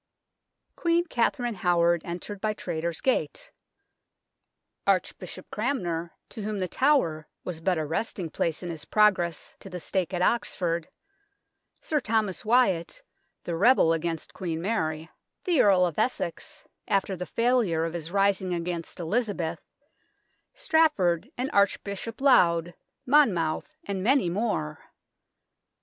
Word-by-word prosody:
Queen 340 0 +1
Katharine 240 -4 0
Howard 175 -3 +2
entered 190 +3 -6
by 215 0 0
Traitors' 170 -3 -3
Gate; - - -1 1.4
Archbishop - - -1
Cranmer, 175 -9 -2 0.2
to 220 - -8
whom 210 0 -3
The 185 - -1
Tower 170 - +1 0.2
was 170 -3 -5
but 180 +1 +1
a 155 - -1
resting 165 +1 -3
place 165 +2 -2
in 175 - -4
his 160 -2 -7
progress 185 -6 +2
to 195 - -10
the 180 -1 -6
stake 180 +3 -2
at 180 -1 -1
Oxford; 170 -7 0 0.9
Sir 305 - 0
Thomas 220 -6 -1
Wyatt, 230 - +2 0.4
the 170 - -3
rebel 200 -3 +5
against 165 -1 -3
Queen 165 -4 -3
Mary; 160 -5 -2 0.4
the 345 -7 +3
Earl 190 -3 +5
of 170 -4 -3
Essex, 175 -9 -3 0.2
after 195 -2 +1
the 180 0 -6
failure 230 -9 +1
of 165 - -4
his 165 -2 -5
rising 195 -2 +1
against 170 0 -4
Elizabeth; 190 -2 -1 0.9
Strafford 305 - +2
and 255 +2 -2
Archbishop 200 +3 0
Laud, 175 - +4 0.3
Monmouth, 235 - +2
and 195 - -3
many 245 -4 +3
more. 205 - -2
185 Hz, 125 wpm, -27 LUFS, 170-230 Hz, 1.4 s, rebel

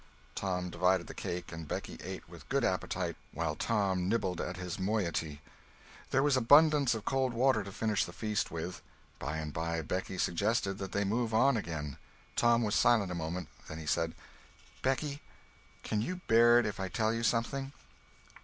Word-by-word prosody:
Tom 90 -2 -2
divided 90 0 +2
the - - -8
cake 85 -1 -5
and 80 -2 -7
Becky - - -5
ate - - -6
with - - -13
good - - +1
appetite, - - -1 0.2
while 80 -2 -1
Tom 95 -4 0
nibbled 95 -6 0
at 90 - -4
his 90 +2 -5
moiety. 85 -7 -1 0.7
There 135 +1 +3
was 145 -2 +4
abundance 145 +1 +6
of 110 0 -6
cold 130 -2 +1
water 120 -2 +3
to 100 - -8
finish 105 0 +1
the - - -8
feast 105 +2 -1
with. 85 +2 -5 0.4
By 75 +4 -3
and 75 -1 -4
by 80 0 -2
Becky 95 +4 -3
suggested 100 +2 0
that 95 -1 -5
they 100 - +1
move 110 +2 0
on 135 +4 +5
again. 80 - -4 0.4
Tom 120 0 +4
was 105 -2 0
silent 110 -5 +4
a - - -2
moment. 85 0 -3 0.2
Then 75 - -6
he 80 - -7
said: 80 +1 0 0.7
"Becky, 140 +2 -1 0.6
can 105 -1 -1
you 180 +9 -3
bear 120 +1 +6
it 120 - +3
if 105 - -3
I 95 - -1
tell 110 +3 +1
you 115 - -2
something?" 130 +4 0
100 Hz, 180 wpm, -32 LUFS, 85-115 Hz, 0.7 s, abundance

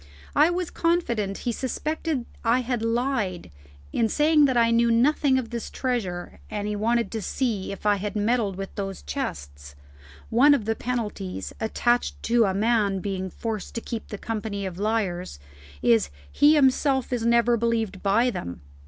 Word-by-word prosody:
I 300 +3 +6
was 350 0 -2
confident 235 - 0
he 240 - +1
suspected 285 +2 -2 0.2
I 240 +2 +3
had 245 -2 -2
lied 230 - -1 0.4
in 225 -1 +2
saying 300 0 +4
I 235 -2 +3
knew 235 0 +3
nothing 265 +3 +3
of 240 -3 -3
this 235 -2 -4
treasure 205 -9 -3
and 205 -1 -3
that - - -2
he 210 - -2
wanted 230 +3 0
to 225 - -3
see 215 -3 -2
if 195 - -9
I 205 -1 +4
had 205 +2 -4
meddled 210 -1 +1
with 195 +1 -6
those 195 -1 -5
chests. 70 - -6 0.6
One 285 +6 +6
of 225 - -3
the 225 - +1
penalties 215 -7 -4
attached 240 +2 +1
to 235 0 +3
a 190 - 0
man 210 -2 +2
being 190 -1 -3
forced 220 +2 -5
to 230 - -2
keep 230 -1 -6
the 210 - -6
company 210 -2 -4
of 185 -1 -6
liars 200 - -1 0.5
is, 115 -11 +4 0.2
he 295 +2 +5
himself 265 -2 +2
is 240 -2 -1
never 235 +1 +4
believed 225 -4 -1
by 225 +5 +3
them. 85 - -6
230 Hz, 170 wpm, -25 LUFS, 200-250 Hz, 0.6 s, I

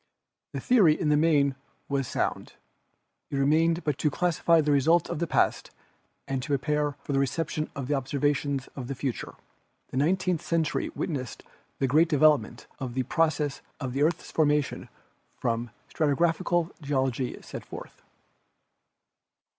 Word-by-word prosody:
The - - -3
theory 200 - +4
in 155 - +1
the 150 - +4
main 150 -3 +3 0.3
was 135 -3 -1
sound; - - -2 0.8
it - - -4
remained 160 +5 +2
but 150 -3 -1
to 150 - +2
classify 170 +1 +2
the 150 -1 +2
results 155 +4 +3
of - - -3
the 170 - -1
past - - +1 0.6
and 135 -1 -2
to 125 - -6
prepare 145 +1 0
for 145 - -3
the 135 - +2
reception 155 +2 -1
of 140 -3 -4
the 145 - 0
observations 140 0 0
of 125 -3 -6
the 135 - -4
future. 130 -1 -4 0.5
The - - -5
nine 160 +8 +3
teenth 185 -3 -1
century 160 -3 0
witnessed 130 -7 -4 0.3
the 135 - +1
great 155 +6 +4
development 150 -6 +3
of 125 -2 -5
the 130 - +1
processes 150 0 0 0.2
of 130 -3 -4
the 135 - -1
earth's 165 +3 0
formation 150 -2 +1 0.5
which 115 0 0 0.3
stratigraphical 165 +3 +1
geology 135 -3 -1
sets - - -8
forth. - - -10
145 Hz, 150 wpm, -27 LUFS, 135-160 Hz, 0.8 s, theory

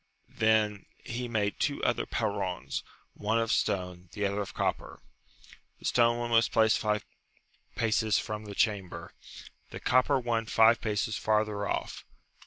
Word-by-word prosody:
Then 110 -2 +1 0.2
he 125 0 -4
made 105 -3 -1
two 140 -1 -1
other 120 - +1
perrons, 100 -5 -2 0.3
one 110 +2 0
of 115 0 0
stone, 90 -4 -1
the 105 - -1
other 100 +1 -1
of 100 - -5
copper: - - -2 0.8
the - - -14
stone 120 -1 +3
one 120 0 -3
was 115 0 +4
placed 110 -1 +3
five 105 -2 -1 0.7
paces 110 -1 +2
from 105 0 -4
the 100 -1 -8
chamber, 95 -5 -1 0.6
the - - -7
copper 130 +2 +3
one 115 -2 -1
five 115 +1 +5
paces 105 0 -1
farther 105 -1 0
off". - - -3
110 Hz, 145 wpm, -29 LUFS, 105-115 Hz, 0.8 s, five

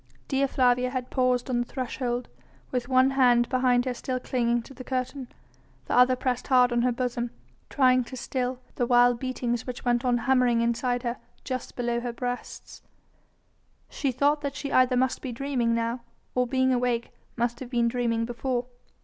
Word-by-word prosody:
Dea 275 0 +1
Flavia 250 -1 +2
had 250 -1 -4
paused 255 -1 +1
on 250 -2 0
the 240 - 0
threshold, 250 -1 -3 0.4
with 245 -1 -2
one 260 +1 +4
hand 245 -3 +4
behind 250 -1 +2
her 255 - -1
still 255 +1 -3
clinging 240 -2 0
to 270 - -13
the 255 - -9
curtain, 255 +1 -3 0.6
the - - -3
other 250 +1 +5
pressed 250 -1 -2
hard 250 -2 +5
on 240 0 +2
her 250 +1 +2
bosom, 240 -1 -2 0.4
trying 255 -2 +4
to 260 - -8
still 255 0 -2 0.2
the 245 - +1
wild 245 -1 +4
beatings 245 -2 -2
which 250 0 -6
went 240 0 +2
on 245 -1 +2
hammering 250 -1 +2
inside 240 +1 0
her 240 0 -2 0.3
just 255 -2 -5
below 240 -1 -1
her 240 0 -4
breasts. 245 +1 -6 1.1
She 275 - -1
thought 290 +4 +2
that 280 -1 -4
she 285 -1 -5
either 255 0 +4
must 260 +1 +1
be 260 - -4
dreaming 240 -2 0
now, 230 +1 -1 0.3
or 250 0 +1
being 260 +1 +2
awake, 245 -1 0 0.3
must 240 0 -1
have 260 - -7
been 240 -2 +1
dreaming 230 -1 0
before. 240 +1 -2
250 Hz, 180 wpm, -26 LUFS, 240-255 Hz, 1.1 s, other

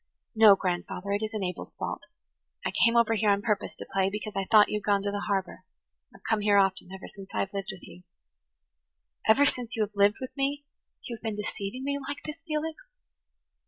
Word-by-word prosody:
"No, 220 -3 +8
grandfather, 185 +1 -3
it 200 +1 0
isn't 215 -2 -3
Abel's 180 -1 -5
fault. - - -4 0.6
I - - 0
came 230 0 +3
over 230 -1 +4
here 215 -1 +2
on 200 0 +2
purpose 210 -3 -1
to - - -8
play, 195 -1 +2
because 210 +1 -5
I 195 0 -1
thought 215 -2 +7
you 210 - 0
had - - -19
gone 200 -1 +2
to 200 - -1
the 205 0 -3
harbour. 195 -2 -2 0.5
I - - -16
have - - -27
come 220 -1 +2
here 205 -1 +4
often, 190 -2 +2
ever 190 0 -8
since 195 -1 -11
I - - +2
have 195 - -3
lived 195 0 -4
with 190 -2 -12
you." 180 - -13 1.3
"Ever 270 +6 +6
since 250 -4 -1
you 220 - +2
have 210 0 -5
lived 200 +1 +4
with 260 -1 -7
me 285 +1 -1 0.4
you 235 - -5
have - - -29
been 220 -2 -3
deceiving 210 +3 -5
me 280 +1 -1
like 285 +1 -6
this, 305 0 -5
Felix?" 315 +8 -3
210 Hz, 220 wpm, -28 LUFS, 195-235 Hz, 1.3 s, No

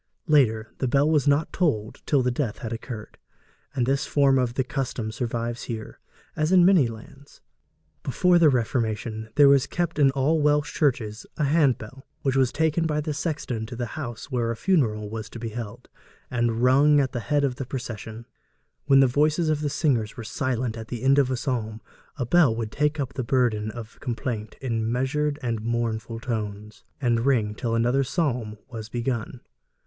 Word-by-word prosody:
Later, 115 -8 +2
the 130 - 0
bell 140 +4 +3
was 150 -2 +2
not 145 +3 +2
tolled 120 - -1
till 140 -4 +3
death 125 -2 -1
had 115 0 -5
occurred, 115 -1 -8 0.6
and 125 -3 +1
this 135 +3 0
form 135 -2 +3
of 125 -1 -1
the 130 - +1
custom 125 -4 -3
survives 120 0 -3
here, 110 -2 -6 0.4
as 155 +2 0
in 180 -2 +6
many 180 -9 +5
lands. 125 +5 -12 0.6
Before 175 +6 +3
the 160 -3 +6
Reformation 110 -3 -1
there 145 -1 +7
was 140 -1 +5
kept 170 -2 -2
in 140 -2 +6
all 140 +4 +1
Welsh 150 +1 +2
churches 115 -7 -1
a - - 0
handbell, 135 -4 +1 0.2
which 135 -1 +1
was 130 -2 +3
taken 160 +2 +1
by 150 -1 0
the 150 0 -2
sexton 145 -7 -3
to 120 - -7
the 120 +1 -3
house 130 -3 -6
where 120 -2 0
a 115 - -1
funeral 110 - +1
was 110 +1 -6
to - - -9
be 115 0 -4
held, 110 -2 -7 0.4
and 120 -1 0
rung 145 +3 +5
at 135 -2 +1
the 120 - -3
head 145 +4 0
of 130 -3 0
the 135 - -4
procession. 115 -3 -6 0.6
When 135 -2 +6
the - - +6
voices 150 +5 +2
of 155 -1 0
the 150 - 0
singers 130 -8 0
were 115 - -6
silent 120 0 -2
at 110 -1 -7
the 120 0 -6
end 135 +1 +5
of 135 -2 +3
a 130 - -1
psalm, 115 -4 -3 0.4
the 125 - -1
bell 145 -4 +4
would 115 -2 -4
take 150 +1 0
up 135 -2 -3
the 130 - -3
burden 115 -4 +1
of 115 -1 -9
complaint 115 -3 -4
in 115 -3 -1
measured 145 +4 0
and 115 -3 -1
mournful 115 0 -2
tones, 105 -3 -5 0.2
and 120 -3 +1
ring 115 -6 +2
till 115 +1 -2
another 120 +4 +2
psalm 125 -8 -1
was 115 -4 -8
begun. 120 0 -3
125 Hz, 185 wpm, -25 LUFS, 115-145 Hz, 0.6 s, there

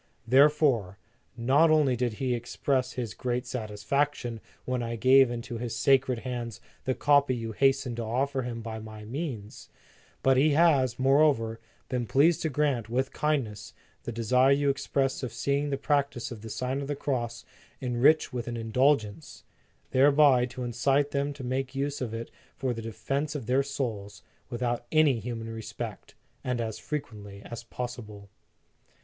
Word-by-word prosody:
Therefore, 130 - +3 0.4
not 135 +7 +4
only 150 -5 +4
did 120 -1 -1
he 125 +3 -1
express 130 +2 -1
his 120 -4 -4
great 125 0 -2
satisfaction 120 +2 -2 0.2
when 125 -1 -1
I 115 0 -3
gave 130 +2 +5
into 120 -1 -5
his 120 -1 -4
sacred 135 -2 +3
hands 120 -4 -5 0.3
the 130 - 0
copy 145 -3 +3
you 115 -1 -4
hastened 135 0 +1
to 120 - -2
offer 130 +4 -1
him 120 -2 -5
by 110 -1 -5
my 110 -1 -10
means, 120 -4 -6 0.5
but 135 -1 +4
he 145 +3 +4
has, 140 -6 +3
moreover, 135 -4 +3 0.3
been 125 -2 -2
pleased 150 - +3
to 160 - 0
grant, 135 -6 0
with 130 +3 -1
kindness, 135 -9 -2 0.3
the - - -5
desire 125 +4 +3
you 140 0 +3
expressed 135 0 -1
of 125 -4 -4
seeing 140 +5 -1
the 140 - -1
practice 140 -4 -1
of 115 -3 -8
the 110 - -8
Sign 130 +4 -2
of 140 - -5
the 145 - -2
Cross 120 -5 -3 0.3
enriched 130 +4 +3
with 120 -1 -4
an 120 - -3
indul 125 +6 +3
gence, 100 -7 -11 0.5
thereby 140 -2 +5
to 125 0 -7
incite 135 +4 +1
them 140 +1 -1
to 140 -2 -9
make 130 +1 -3
use 140 +1 -2
of 120 -4 -3
it 115 +1 -6 0.3
for 130 -2 -1
the 115 - -6
defence 135 +7 -3
of 135 -6 -4
their 130 +4 +2
souls, 115 -8 -4 0.3
without 120 0 -2
any 155 -6 +4
human 115 0 -5
respect, 110 -1 -7 0.3
and 125 -1 -1
as 110 -2 -3
frequently 105 -9 -6
as 120 -1 -7
possible. 115 -5 -7
125 Hz, 165 wpm, -28 LUFS, 115-140 Hz, 0.5 s, gave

